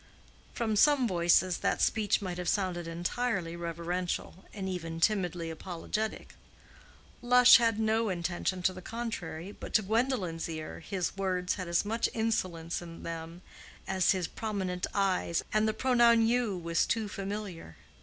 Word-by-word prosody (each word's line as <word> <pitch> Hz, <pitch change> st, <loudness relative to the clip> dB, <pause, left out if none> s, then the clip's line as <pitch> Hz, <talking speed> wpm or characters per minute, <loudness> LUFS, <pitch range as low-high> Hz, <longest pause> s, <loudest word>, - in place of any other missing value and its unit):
From 220 Hz, -2 st, 0 dB
some 270 Hz, +3 st, +5 dB
voices 175 Hz, -1 st, +3 dB
that -, -, 0 dB
speech 210 Hz, -1 st, +2 dB
might 180 Hz, -2 st, -4 dB
have 180 Hz, -, -1 dB
sounded 180 Hz, -4 st, -1 dB
entirely 175 Hz, +1 st, -2 dB
reverential, 170 Hz, +2 st, -4 dB
and 195 Hz, -2 st, -5 dB
even 165 Hz, -3 st, -4 dB
timidly 175 Hz, -4 st, 0 dB
apologetic. 185 Hz, +6 st, -4 dB, 0.9 s
Lush 250 Hz, 0 st, +8 dB
had 230 Hz, -2 st, +1 dB
no 220 Hz, 0 st, +1 dB
intention 175 Hz, +1 st, -2 dB
to 185 Hz, -, +2 dB
the 185 Hz, -, -9 dB
contrary, 195 Hz, -6 st, -5 dB
but -, -, -8 dB
to 215 Hz, -, +5 dB
Gwendolen's 210 Hz, -7 st, -1 dB
ear 155 Hz, -1 st, -6 dB
his 180 Hz, +1 st, -3 dB
words 185 Hz, -2 st, -1 dB
had 185 Hz, -3 st, -5 dB
as 170 Hz, +3 st, +1 dB
much 225 Hz, +3 st, 0 dB
insolence 185 Hz, -8 st, -1 dB
in 165 Hz, -1 st, -10 dB
them 165 Hz, +1 st, -7 dB, 0.4 s
as 190 Hz, -1 st, +3 dB
his 185 Hz, -4 st, 0 dB
prominent 190 Hz, -4 st, -3 dB
eyes, 190 Hz, -4 st, +1 dB
and 215 Hz, 0 st, +3 dB
the -, -, +2 dB
pronoun 235 Hz, -2 st, +4 dB
"you" 230 Hz, -4 st, +1 dB
was 170 Hz, -1 st, 0 dB
too 225 Hz, -2 st, 0 dB
familiar. 195 Hz, -, -6 dB
185 Hz, 145 wpm, -30 LUFS, 170-220 Hz, 0.9 s, Lush